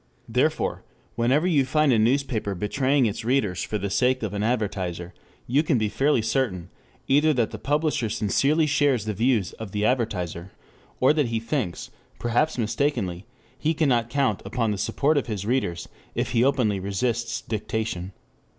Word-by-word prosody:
Therefore, - - 0 0.3
whenever 130 +7 +2
you 155 -7 +3
find 150 +1 +2
a 115 - +3
newspaper 115 -3 +1
betraying 130 +8 +1
its 110 +1 -2
readers 110 -7 0
for 105 - -2
the 100 -1 -3
sake 130 +2 +2
of 105 -2 -3
an 100 - -2
advertiser, 100 -7 -2 0.3
you 135 +5 +2
can 155 -4 +1
be 110 -2 0
fairly 135 -1 +2
certain 110 -7 -1 0.4
either 150 +3 +4
that 120 -5 0
the - - -7
publisher 150 -4 0
sincerely 135 +9 +2
shares 140 -6 +2
the 110 - -2
views 115 -2 +1
of 110 -3 -7
the 105 0 0
advertiser, 95 -8 -1 0.5
or 130 +3 +5
that 150 -4 +1
he 115 -1 -1
thinks, 115 - -3 0.3
perhaps 120 +7 0
mistakenly, 110 -5 -1 0.3
he 160 +1 -1
cannot 125 -7 +2
count 135 -6 0
upon 115 +2 -1
the 100 - -3
support 145 +7 +1
of 130 - -6
his 105 -4 -4
readers 105 -8 -1 0.3
if - - -1
he 120 -1 +3
openly 125 -7 +2
resists 115 +4 -1
dictation. 110 -4 -3
115 Hz, 165 wpm, -25 LUFS, 105-135 Hz, 0.5 s, or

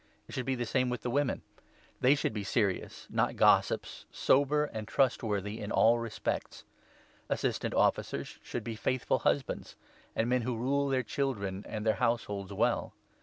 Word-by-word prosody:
It - - -11
should 130 -1 -3
be 135 - +1
the 120 -1 -2
same 125 +2 +1
with 125 -2 -3
the 120 - -1
n - - -4
women. 145 -1 +1 0.6
They 130 +3 +5
should 140 - -1
be 105 -2 -3
serious> 100 -1 -1
not - - 0
gossips, - - +3
sober, 145 +2 +3
and 110 -6 -6
trustworthy 110 -5 0
in 105 - -5
all 115 +1 +5
respects. 115 -2 -3 0.7
Assistant - - -1
Officers - - 0
should 120 - -5
be 115 0 -4
12 110 - -10
faithful 130 -1 +1
husbands, - - -1 0.4
and 115 - +1
men 125 0 +2
who 120 0 -2
rule 140 +4 +1
their 130 -1 +1
children 105 -8 -2
and 110 -1 -4
their 110 - +4
households 105 -5 0
well. 100 - 0
120 Hz, 170 wpm, -31 LUFS, 105-130 Hz, 0.7 s, They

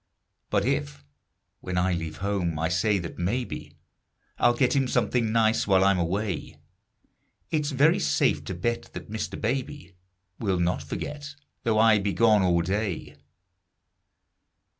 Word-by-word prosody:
But - - +1
if, 70 0 -2 0.6
when 90 -1 -4
I 90 0 +2
leave 80 -2 -4
home, 90 -6 -1
I 80 +2 0
say 100 +3 +2
that 85 -3 -6
maybe 115 +8 -3 0.6
I'll 120 0 +4
get 125 +2 +2
him 135 -2 +2
something 120 -3 +1
nice 110 -1 +2
while 95 -1 +4
I'm 100 -1 +3
away, 95 +2 -2 0.9
It's 150 -2 0
very 145 +3 +3
safe 70 0 +1
to 95 - -4
bet 120 +7 -2
that - - -8
Mr. 110 - -4
Baby 130 +1 -3 0.5
Will 95 -5 0
not 85 +1 0
forget, 145 -1 -6 0.3
though 115 -3 +1
I 110 -1 +5
be 100 0 -1
gone 110 -3 +4
all 85 -2 +2
day. 95 -5 -3
100 Hz, 140 wpm, -26 LUFS, 90-115 Hz, 0.9 s, I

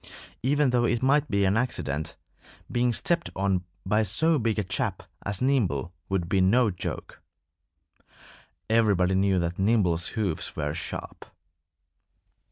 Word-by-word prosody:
Even 140 +1 +2
though 120 -1 +2
it 120 +1 0
might 145 +2 +3
be 100 -2 +2
an 95 +1 +2
accident, 80 - -2 0.6
being 120 0 +2
stepped 170 +8 0
on 95 -2 0 0.2
by 105 +3 +2
so 155 - +3
big 115 -2 0
a 105 - +1
chap 95 0 -2 0.2
as 100 +3 -2
Nimble 95 - +1 0.2
would 95 -3 -1
be 95 +1 +2
no 110 +4 +4
joke. 90 - -6 1.5
Everybody 105 -5 +3
knew 95 0 +2
that 85 0 -2
Nimble's 95 -5 +2
hoofs 95 -8 -2
were 75 0 -2
sharp. 80 - -6
100 Hz, 135 wpm, -26 LUFS, 90-120 Hz, 1.5 s, no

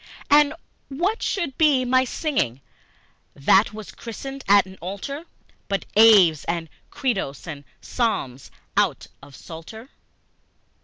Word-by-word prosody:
And 295 +1 +5 0.3
what 350 - -1
should 340 - -2
be 285 -5 +4
my 255 +1 +3
singing, 245 - -2 0.7
that 190 +10 +4
was 215 -1 -9
christened 270 +4 -8
at 200 -1 +6
an 190 0 -13
altar, 200 - -6 0.4
But 195 -1 -2
Aves 200 -8 +6
and 170 -1 -3 0.2
Credos 195 - -3
and 150 -4 -7 0.2
Psalms 140 - -2 0.3
out - - +1 0.2
of 140 - -14
Psalter? 220 +10 -11
220 Hz, 115 wpm, -23 LUFS, 170-270 Hz, 0.7 s, at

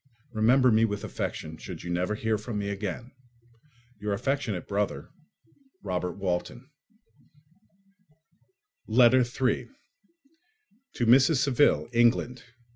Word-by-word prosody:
Remember 125 +4 +4
me 110 +1 +4
with 105 -2 -1
affection, 80 0 -5
should - - -9
you 85 - -5
never 90 +4 -1
hear 110 -1 -1
from 110 0 -5
me 100 -1 -3
again. 100 +5 -5 0.9
Your 105 0 -2
affectionate 120 -4 -2
brother, 100 0 -3 0.7
Robert 90 -2 -2
Walton 100 +8 -4 2.2
Letter 125 +2 +5
3 125 +1 -1 1.3
_To 120 - +1
Mrs. 130 +7 +5
Saville, 140 +1 +2
England. 120 +1 +2
110 Hz, 105 wpm, -27 LUFS, 100-125 Hz, 2.2 s, Letter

